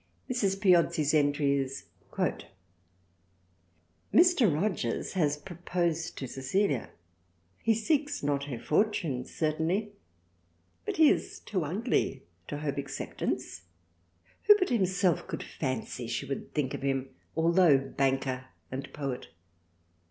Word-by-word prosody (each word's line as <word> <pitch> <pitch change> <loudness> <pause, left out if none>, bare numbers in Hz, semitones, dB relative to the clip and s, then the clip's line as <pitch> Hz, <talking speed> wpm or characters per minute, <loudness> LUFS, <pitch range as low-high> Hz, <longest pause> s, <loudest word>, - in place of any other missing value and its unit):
Mrs. 200 -7 0
Piozzi's 170 -6 +4
entry 145 -1 +3
is: 135 0 -4
— - - -35
" - - -34
Mr. - - -2 2.0
Rogers 155 - -1
has 150 -5 +1
proposed 170 -1 -2
to 130 - -4
Cecilia, 135 - 0 0.7
he 225 -1 +3
seeks 290 - 0
not 140 -1 0
her 135 -4 -5
fortune 155 - 0
certainly, 165 +7 -1 1.0
but - - -2
he 315 -1 +7
is - - -2
too 185 -5 -2
ugly 200 - -1 0.2
to 145 - -4
hope 145 -2 -2
acceptance, 135 - -4 0.8
who 415 0 +9
but 370 -3 0
himself 190 -6 +1
could - - -4
fancy 130 -3 -4
she 130 - -2
would 135 0 -5
think 140 -4 -1
of - - -4
him? 135 -1 -1 0.3
Altho' 165 -2 +5
Banker 135 -1 -1 0.2
& 135 +2 -6
Poet. 140 -4 -4
150 Hz, 120 wpm, -29 LUFS, 135-190 Hz, 2.0 s, who